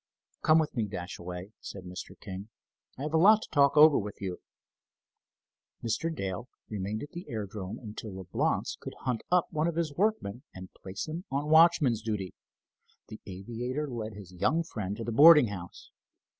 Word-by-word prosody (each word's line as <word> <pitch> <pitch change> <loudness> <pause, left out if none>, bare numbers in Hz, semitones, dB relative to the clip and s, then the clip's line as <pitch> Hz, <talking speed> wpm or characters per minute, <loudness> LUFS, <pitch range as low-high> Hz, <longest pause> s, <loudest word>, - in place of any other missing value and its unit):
"Come 155 - +5
with 155 -3 0
me, 115 -4 0
Dashaway," 90 0 -6
said 95 - -8
Mr. 90 0 -8
King. 100 +1 -8 0.5
"I 135 - -5
have 150 +1 -3
a 160 - +4
lot 215 +5 +6
to - - -10
talk 140 0 +4
over 150 0 +8
with 105 0 -6
you." 95 -3 -4 1.4
Mr. 120 +8 -1
Dale 100 - -4 0.2
remained 105 +2 -3
at 145 - -9
the 175 +2 -8
aerodrome 105 -4 -5
until 110 -3 -8
Leblance 95 -2 -1
could - - -8
hunt 125 -3 -1
up 180 -1 +4
one 155 +1 +1
of 170 - -2
his 165 -3 -1
workmen 185 - 0
and 95 0 -10
place 95 +7 -6
him 165 +4 -5
on 145 +3 -2
watchman's 160 -7 +5
duty. 105 -5 -3 0.8
The 110 - -9
aviator 120 +9 -4
led 115 -4 -5
his 100 -3 -11
young 155 - +1
friend 105 - -5
to 115 - -4
the 115 - -3
boarding 150 0 +8
house. 90 -4 -9
115 Hz, 170 wpm, -29 LUFS, 100-155 Hz, 1.4 s, over